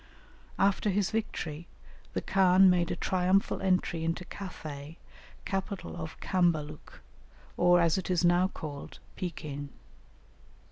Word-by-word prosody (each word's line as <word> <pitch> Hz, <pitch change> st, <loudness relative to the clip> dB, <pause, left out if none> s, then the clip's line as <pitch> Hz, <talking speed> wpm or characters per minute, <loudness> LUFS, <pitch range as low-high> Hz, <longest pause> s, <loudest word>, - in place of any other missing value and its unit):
After 200 Hz, +1 st, +2 dB
his 200 Hz, -1 st, +1 dB
victory 170 Hz, -7 st, -3 dB, 0.5 s
the -, -, -1 dB
khan 190 Hz, 0 st, +5 dB
made 175 Hz, -1 st, +1 dB
a -, -, -1 dB
triumphal 185 Hz, +1 st, +1 dB
entry 185 Hz, -3 st, +1 dB
into 165 Hz, +2 st, -2 dB
Cathay, 155 Hz, -6 st, -8 dB, 0.5 s
capital 195 Hz, 0 st, -3 dB
of 160 Hz, -2 st, -7 dB
Cambaluc, 160 Hz, -5 st, -1 dB, 0.5 s
or, 175 Hz, 0 st, +5 dB
as 170 Hz, +1 st, +3 dB
it 185 Hz, -, -6 dB
is 180 Hz, -1 st, +2 dB
now 175 Hz, +2 st, +4 dB
called, 145 Hz, -6 st, -8 dB, 0.2 s
Pekin. 145 Hz, -5 st, -5 dB
175 Hz, 120 wpm, -30 LUFS, 160-190 Hz, 0.5 s, khan